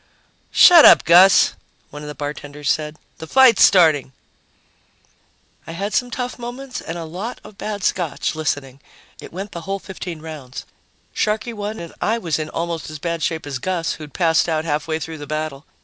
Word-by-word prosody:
"Shut 340 -3 +8
up, - - +8
Gus," 180 +3 +6 0.4
one 150 - -9
of 150 - -8
the 150 - -7
bartenders 145 0 -4
said. 155 0 -3 0.2
"The 160 - -8
fight's 260 +1 +5
starting." 155 -8 +4 1.5
I 165 - -7
had 200 +5 -4
some 245 -1 0
tough 250 0 -5
moments 250 +2 -7
and 165 - -6
a 165 - -6
lot 190 +9 -6
of 200 - -15
bad 205 -2 -5
Scotch, 170 -7 -1
listening. 145 -4 -3 0.4
It - - -11
went 195 +4 -7
the 170 - -7
whole 195 +4 -3
15 180 -4 -8
rounds, 150 -5 -9 0.5
Sharkey 220 +3 -1
won, 210 0 -5
and 170 -1 -9
I 225 +2 +1
was 165 -8 -2
in 155 0 -4
almost 170 -1 -4
as 155 - -7
bad 170 +1 -4
shape 160 -2 -2
as 140 -3 -5
Gus, 175 +1 -2
who'd 150 -3 -11
passed 165 -1 +2
out 160 0 -1
halfway 155 +1 -2
through 160 0 -7
the 145 - -8
battle. 155 -2 -5
165 Hz, 180 wpm, -20 LUFS, 155-195 Hz, 1.5 s, Shut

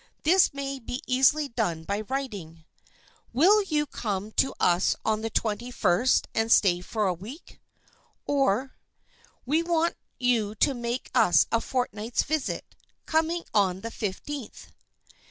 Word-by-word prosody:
This 360 +5 +5
may 275 -1 -4
be 250 +4 -6
easily 270 +4 +3
done 175 -9 -2
by 200 +5 -2
writing—"Will 245 - -2
you 305 -6 0
come 210 -6 -4
to 270 - +1
us 175 +1 +3
on 215 0 +1
the 225 - -2
twenty 225 +2 -2
first 240 +1 +2
and 225 0 0
stay 180 -6 +4
for 215 +3 -2
a 185 - +2
week?" 220 - -11 0.6
or, 270 -3 +1 0.7
"We 305 +6 +2
want 335 0 0 0.2
you 230 -4 +1
to 275 - +2
make 240 0 -4
us 195 - +5
a 230 - +2
fortnight's 235 -3 -2
visit, 310 -2 -2 0.4
coming 325 +2 0
on 190 -3 +2
the 230 - -6
fifteenth." 225 +6 -6
235 Hz, 135 wpm, -27 LUFS, 205-280 Hz, 0.7 s, This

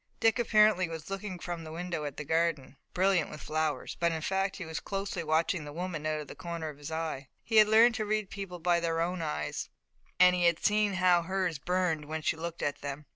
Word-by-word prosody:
Dick 225 -1 +3
apparently 215 -5 +4
was 160 +2 -7
looking 195 -1 -4
from 175 -1 -5
the 155 - -8
window 170 -2 -4
at 145 -2 -6
the - - -4
garden, 160 -3 0 0.2
brilliant 185 -3 +2
with 150 - -8
flowers, 155 -1 -2
but 170 0 +2
in 160 -1 -3
fact 195 +2 0
he 180 - -6
was 160 0 -4
closely 195 -3 -3
watching 160 +2 +1
the 145 - -8
woman 165 -1 -4
out 155 0 -1
of 150 - -7
the - - -8
corner 170 -2 -5
of 145 -1 -11
his 145 +1 -7
eye. 160 -4 -3 0.2
He 225 - +1
had 215 -1 +8
learned 225 +2 +6
to 215 -1 -2
read 215 -2 -1
people 195 -3 -6
by 175 0 +2
their 165 -1 -1
own 175 +1 -1
eyes, 75 - -3 0.5
and 180 0 +7
he 175 -1 +1
had 170 -1 +4
seen 210 -1 +3
how 180 -1 +4
hers 180 -3 -1
burned 175 -2 0
when 155 +1 -4
she - - +1
looked 170 +1 -5
at 145 0 -2
them. 145 +1 -5
170 Hz, 235 wpm, -30 LUFS, 155-190 Hz, 0.5 s, had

